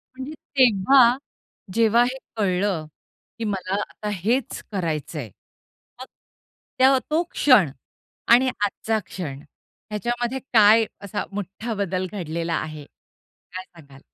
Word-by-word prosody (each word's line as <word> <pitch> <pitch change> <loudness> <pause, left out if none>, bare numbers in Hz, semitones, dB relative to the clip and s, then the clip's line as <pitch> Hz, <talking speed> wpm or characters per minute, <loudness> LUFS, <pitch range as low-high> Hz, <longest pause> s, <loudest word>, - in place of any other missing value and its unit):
म्हणजे 265 +4 -6 0.2
तेव्हा 245 +1 +5 0.6
जेव्हा 230 +1 +4
हे 250 +2 -2 0.2
कळलं 185 -5 0 0.5
की 230 - -3
मला 195 -2 -2
आता 210 - -7
हेच 225 +7 -1
करायचंय, 155 - -3 0.7
मग 255 - -7 0.7
त्या 265 +1 +6
तो 320 +3 +2
क्षण 215 - +5 0.6
आणि 255 +2 +4
आजचा 220 +2 0
क्षण 145 -7 -6 0.5
ह्याच्यामध्ये 240 +4 -2
काय 220 0 +6 0.2
असा 200 +1 -3
मोठा 205 +3 -5
बदल 185 -2 -2
घडलेला 170 -3 -3
आहे 155 -2 -4 0.7
काय 185 0 -5
सांगाल? 140 -7 -17
205 Hz, 110 wpm, -23 LUFS, 180-240 Hz, 0.7 s, त्या